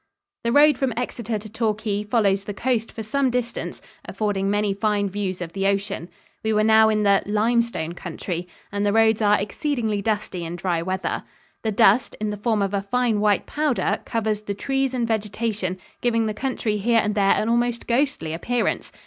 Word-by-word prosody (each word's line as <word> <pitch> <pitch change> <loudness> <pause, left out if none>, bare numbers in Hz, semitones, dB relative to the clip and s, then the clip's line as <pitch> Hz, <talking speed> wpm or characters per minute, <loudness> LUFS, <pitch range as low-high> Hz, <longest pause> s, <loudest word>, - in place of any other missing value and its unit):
The 235 - +1
road 290 0 +5
from 265 -3 0
Exeter 235 -2 -2
to 210 +1 -9
Torquay 215 -1 -1
follows 200 -3 +1
the 205 - -5
coast 235 -1 -1
for 225 - -6
some 265 +5 +1
distance, 245 -1 -3 0.2
affording 200 -2 -1
many 205 0 +1
fine 205 0 0
views 190 -2 -3
of 165 - -8
the 195 0 0
ocean. 195 -3 -1 0.3
We 220 0 0
were 215 0 +3
now 220 0 +6
in 215 -1 +1
the 200 -1 +4
"limestone 215 -5 +1
country," 175 0 -5 0.2
and 200 0 -1
the 205 0 +2
roads 225 0 +4
are 210 0 +4
exceedingly 220 0 -1
dusty 205 -4 -2
in 165 +1 -5
dry 175 -1 -1
weather. 185 +2 -2 0.4
The 220 - -1
dust, 220 +2 +4
in 210 0 -1
the 210 - -4
form 210 0 +1
of 195 0 -2
a 200 - +1
fine 230 +1 +1
white 205 -1 +2
powder, 295 -4 0
covers 215 -2 -1
the 205 -1 -4
trees 270 +3 -1
and 240 -2 0
vegetation, 210 -3 -2 0.2
giving 230 -2 +2
the 215 - -1
country 230 -3 -2
here 230 +3 +3
and 210 -1 0
there 200 -2 +3
an 215 - 0
almost 235 0 +1
ghostly 245 - 0
appearance. 240 +8 -1
215 Hz, 190 wpm, -23 LUFS, 200-235 Hz, 0.4 s, now